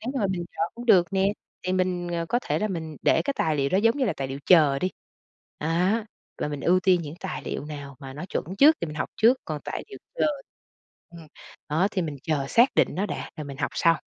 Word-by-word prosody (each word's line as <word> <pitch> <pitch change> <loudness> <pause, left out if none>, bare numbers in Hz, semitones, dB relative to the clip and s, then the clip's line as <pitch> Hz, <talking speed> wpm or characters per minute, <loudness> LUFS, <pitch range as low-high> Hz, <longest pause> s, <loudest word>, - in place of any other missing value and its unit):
nếu 245 +4 -4
mà 200 - +2
mình 185 -2 -2
chờ - - -3
cũng 240 +1 -8
được 180 -6 +6
nè, 195 +1 +2 0.3
thì 185 - -1
mình, 180 -1 0
ờ, 170 -1 -2
có 240 - +2
thể - - -1
là 215 - -1
mình 160 -5 -5
để - - +4
cái 280 - -1
tài 155 -1 +1
liệu 140 -1 +1
đó 185 - +2
giống 230 +5 +3
như 270 - +1
là 210 - +1
tài 135 -1 -3
liệu 135 - -5
chờ 150 -6 +6
đi, 185 - -1 0.7
đó, 180 +8 +1 0.3
và - - -1
mình 145 -1 -4
ưu 180 +2 +3
tiên 180 -2 +3
những 150 -1 -7
tài 190 -1 -5
liệu - - -4
nào 145 -3 -8
mà 135 -1 -8
nó 150 +6 -7
chuẩn - - -2
trước 305 +5 +7
thì - - -1
mình 150 - -7
học 125 - -2
trước, 240 +4 +5
còn 150 -2 -4
tài - - -4
liệu 410 - -10 0.2
chờ - - +2 0.8
ừm, 170 -2 -12 0.4
đó, 170 +7 +2
thì 185 -4 -1
mình 150 -3 -4
chờ 145 -4 -1
xác 240 - +4
định - - +4
nó 195 +4 -1
đã - - -5
rồi 155 - -5
mình 140 -1 -8
học 135 - -1
sau. 165 -1 +3
175 Hz, 255 wpm, -26 LUFS, 150-200 Hz, 0.8 s, trước